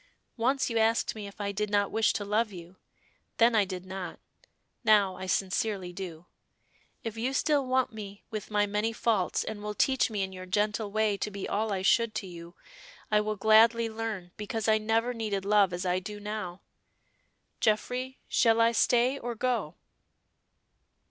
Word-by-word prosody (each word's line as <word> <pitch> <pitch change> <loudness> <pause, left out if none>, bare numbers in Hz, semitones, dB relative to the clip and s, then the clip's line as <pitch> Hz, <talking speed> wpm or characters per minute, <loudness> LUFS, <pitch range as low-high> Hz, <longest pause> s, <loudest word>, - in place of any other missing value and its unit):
Once 260 +4 +1
you 230 -2 0
asked 225 +1 +2
me 210 -2 -7
if 200 - -13
I 200 -1 -2
did 210 +1 -2
not 205 -1 +1
wish 220 -1 +3
to 205 - -3
love 215 +2 +1
you; 180 0 -11 0.6
then 230 +1 +5
I 210 -3 +4
did 185 -1 -6
not, 185 -1 -6 0.6
now 205 -4 +4
I 185 +1 -6
sincerely 190 -1 -1
do. 175 -3 -7 0.8
If 225 -1 -5
you 250 +4 -1
still 285 -1 +1
want 255 -2 +1
me 205 -2 -9
with 215 -2 -5
my 205 -1 +2
many 210 +2 -1
faults, 215 -5 +1
and 210 -1 -6
will 210 0 -4
teach 265 +2 +2
me 210 -3 -1
in 190 0 -5
your 185 0 -8
gentle 210 +2 0
way 215 -1 +1
to 210 - -3
be 200 -1 -5
all 215 +1 -1
I 190 -1 -2
should 230 +2 +3
to - - -3
you, 170 -1 -10 0.6
I 210 0 +4
will 215 0 -2
gladly 225 +2 +5
learn, 220 -5 -5
because 215 +1 -3
I 215 0 +4
never 225 +3 +1
needed 210 -4 -3
love 205 -2 +4
as 175 +1 -4
I 180 0 +1
do 205 +3 -7
now. 205 -3 -5 1.0
Geoffrey, 250 +4 0
shall 230 -2 +3
I 230 0 +5
stay 245 +3 +2
or 240 0 -4
go?" 230 -9 -1
210 Hz, 180 wpm, -29 LUFS, 195-225 Hz, 1.0 s, then